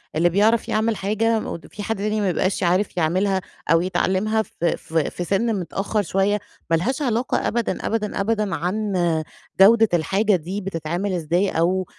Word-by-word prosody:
اللي 170 +3 +3
بيعرف 215 +5 +2
يعمل 220 +1 +1
حاجة 220 +3 0
مود 170 - -6
في 205 - -8
حد 225 +2 -1
تاني 210 +2 -1
ما 200 - +1
بيبقاش 185 +2 0
ي - - +1
عارف 180 +3 +1
يعملها 185 +4 +1 0.3
أو 165 0 +5
يتعلّمها 190 +4 +1
في 175 -4 -2
في 160 -2 -1
في 180 - -5
سِن 210 +6 0
متأخر 195 +4 -2
شوية، 195 +2 +1 0.3
ما 165 - +4
لهاش 250 - -1
علاقة 240 -2 0
أبدًا، 235 -1 -2
أبدًا، 210 -3 -1
أبدًا 210 -2 0
عن 205 +5 -2 0.7
جودة 220 +3 +7
الحاجة 195 +6 +2
دي 180 +4 -4
بتتعمل 180 +1 -3
إزاي 175 +3 0
أو 185 +3 +1
195 Hz, 170 wpm, -22 LUFS, 175-215 Hz, 0.7 s, جودة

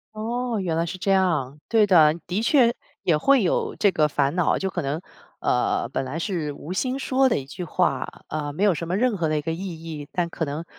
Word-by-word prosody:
哦， 235 +1 -2
原 170 -3 -1
来 165 +1 +1
是 180 - -5
这 190 +2 -3
样！ 160 -8 +1
对 220 -3 +4
的， 155 -5 +6
的 195 +6 -1
确 240 -3 +4 0.3
也 160 -4 +3
会 265 - +4
有 175 - 0
这 200 -2 +4
个 150 -3 +2
烦 140 +2 0
恼。 180 - +2
就 190 - -2
可 180 -2 -3
能， 145 +4 -3 0.4
呃 125 -1 +1
本 135 - -2
来 130 +5 -4
是 165 -5 -2
无 155 +5 -7
心 255 +6 -1
说 265 0 +2
的 - - +1
一 135 - -8
句 175 +6 -7
话， 170 -6 0 0.2
呃， 150 -1 -3
没 185 +8 -2
有 200 -4 +5
什 170 +2 -5
么 185 - 0
任 245 -1 +2
何 165 -4 -1
的 155 - +1
一 - - -1
个 165 +2 -2
意 170 -2 -6
义， 150 -3 -7
但 175 -2 -1
可 165 - -4
能 155 +3 -4
170 Hz, 255 characters per minute, -24 LUFS, 150-205 Hz, 0.4 s, 的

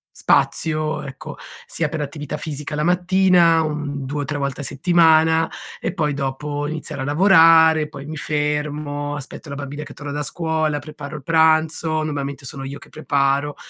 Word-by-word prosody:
spazio, 155 -1 +1
ecco, 135 -1 -9 0.3
sia 160 -3 -2
per 160 - -4
attività 145 +1 -5
fisica 150 0 -5
la 150 - -1
mattina, 180 -1 +4
un 150 -3 -4
2 145 +2 -3
o - - -3
3 145 +2 -3
volte 140 -1 -3
a - - -6
settimana 160 +1 +3 0.3
e - - -1
poi 150 -5 0
dopo 145 +1 -3
iniziare 155 -2 -5
a - - -2
lavorare; 160 -1 +5
poi 140 - -9
mi 155 +2 -6
fermo, 150 -1 -2
aspetto 145 +1 -8
la 140 - -5
bambina 140 +1 -6
che 145 -1 -11
torna 145 +1 -7
da 145 +1 -3
scuola, 160 -1 -1
preparo 150 0 -9
il 150 - -8
pranzo- 160 0 +2
normalmente 140 -2 -4
sono 135 0 -6
io 135 +1 -6
che - - -16
preparo- 140 -1 0
150 Hz, 170 wpm, -21 LUFS, 145-160 Hz, 0.3 s, lavorare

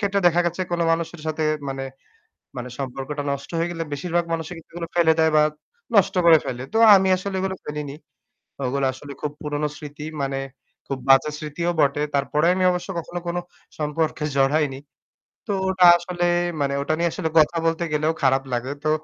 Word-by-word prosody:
ক্ষেত্রে 200 -1 +1
দেখা 175 0 +4
গেছে 175 +2 -2
কোনো 170 -1 +1
মানুষের 165 0 -3
সাথে 155 0 -2 0.3
মানে, 135 0 -4 0.7
মানে 125 0 -5
সম্পর্কটা 135 +2 -4
নষ্ট 140 0 -6
হয়ে 165 +1 0
গেলে 165 -1 -4
বেশিরভাগ 170 +4 -1
মানুষই 165 +1 -3
কিন্তু 165 - -16
এগুলো 170 -1 -5
ফেলে 165 -2 +5
দেয় 160 0 +4
বা 150 - +6 0.5
নষ্ট 195 - +4
করে 165 -1 +8
ফেলে। 125 0 -4
তো 220 - -1 0.2
আমি 190 0 +2
আসলে 190 +1 -5
এগুলো 190 0 -2
ফেলিনি। 150 -1 -5 0.7
ওগুলা 135 +2 0
আসলে 140 +2 -10
খুব 150 - -2
পুরনো 150 0 -2
স্মৃতি 150 0 -9 0.2
মানে 135 0 -2 0.5
খুব 135 - -3
বাজে 135 +3 +6
স্মৃতিও 155 +3 -2
বটে। 140 +1 +2
তারপরে 145 +3 +1
আমি 185 - 0
অবশ্য 180 +1 -3
কখনো 175 +1 -5
কোনো 175 +1 -1 0.4
সম্পর্কে 150 +1 -1
জড়াইনি। 135 0 +2 0.7
তো 210 - -2 0.2
ওটা 185 -1 +5
আসলে 175 0 -3 0.4
মানে, 140 -1 0
ওটা 155 - 0
নিয়ে 170 0 +1
আসলে 160 - -2
কথা 155 +2 +4
বলতে 165 +1 0
গেলেও 155 +1 +1
খারাপ 135 0 +3
লাগে। 125 +2 -2
তো 155 - +2
155 Hz, 180 wpm, -23 LUFS, 140-175 Hz, 0.7 s, করে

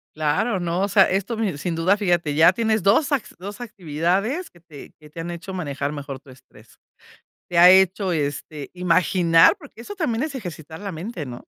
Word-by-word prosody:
Claro, 155 +8 0
¿no? 175 +1 -2
O 200 - +1
sea, 200 - +5
esto, 200 +5 -1
me 210 -7 -1
sin 165 +3 -3
duda, 170 +5 +2
fíjate, 175 -7 0
ya 160 +4 +6
tienes 220 +1 0
2 220 - +2
acti 280 - -2
2 200 +6 -8
actividades 195 - -2
que 175 - -22
te 160 -4 -13
que 150 -1 -16
te 160 - -11
han 165 +1 -5
hecho 175 +3 -8
manejar 145 -5 -3
mejor 140 -2 -7
tu 135 - -17
estrés. 130 - -20 0.7
Te 175 - -2
ha 175 +1 +9
hecho, 190 +1 +4
este, 145 -1 -4
imaginar, 180 - +4
porque 285 - -14
eso 410 +12 -9
también 270 - -1
es 310 -3 -4
ejercitar 160 - -8
la 200 -1 -6
mente, 175 0 -6
¿no?, 120 -2 -9
180 Hz, 195 wpm, -22 LUFS, 160-205 Hz, 0.7 s, ha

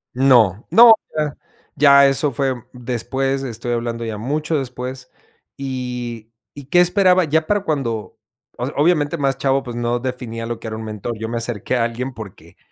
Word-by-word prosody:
No, 120 -6 +4
no, 230 +6 +9 0.2
ya 150 -2 -2 0.4
ya 140 -1 +7
eso 140 +2 +1
fue 135 +1 0 0.2
después, 130 +2 -2
estoy 120 -2 -5
hablando 115 0 -2
ya 110 -2 -5
mucho 150 +6 -1
después. 130 0 -6 0.5
Y 125 -4 -5 0.2
¿y 145 -2 -10
qué 175 +6 +4
esperaba?, 185 0 +4
ya 160 0 0
para 205 -1 +1
cuando, 125 - -3 0.4
o - - -2
sea, - - -7
obviamente 150 0 +2
más 135 -3 -1
chavo, 135 0 +1
pues, 120 -3 -7
no 120 0 -1
definía 120 -2 -5
lo 115 0 -5
que 115 - -8
era 110 - -4
un 110 - -6
mentor. 110 +2 -5
Yo 110 +1 -5
me 120 - -3
acerqué 115 0 -3
a 120 - +1
alguien 120 +3 -3
porque 100 -6 -12
125 Hz, 180 wpm, -20 LUFS, 115-140 Hz, 0.5 s, no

